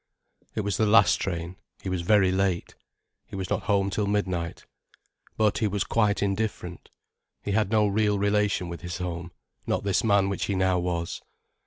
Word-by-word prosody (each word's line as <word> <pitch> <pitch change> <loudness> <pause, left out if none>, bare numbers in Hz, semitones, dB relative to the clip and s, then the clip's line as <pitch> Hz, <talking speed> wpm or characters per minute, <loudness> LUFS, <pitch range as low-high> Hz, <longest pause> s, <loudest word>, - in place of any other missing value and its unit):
It 110 - 0
was 100 -2 -1
the 110 - +2
last 110 +2 +5
train, 85 -1 -4 0.3
he - - -6
was 90 -2 -1
very 95 +1 +4
late. 95 -2 0 0.5
He - - -9
was 95 -2 -4
not - - -1
home 100 -1 +2
till 100 +1 -1
midnight. 95 -5 -2 0.7
But 105 -2 +2
he 110 - +2
was 100 -1 -1
quite 105 -3 +1
indifferent. 100 -3 -3 0.5
He 100 - -2
had 105 -1 +1
no 110 -1 +3
real 105 0 +2
relation 100 -2 +1
with 85 0 -7
his 90 -1 -5
home, 85 -1 -5 0.4
not - - 0
this 100 -2 +1
man 100 -3 +3
which 100 -1 -2
he 100 - -1
now 95 -1 +2
was. 85 -1 -3
100 Hz, 180 wpm, -26 LUFS, 90-105 Hz, 0.7 s, last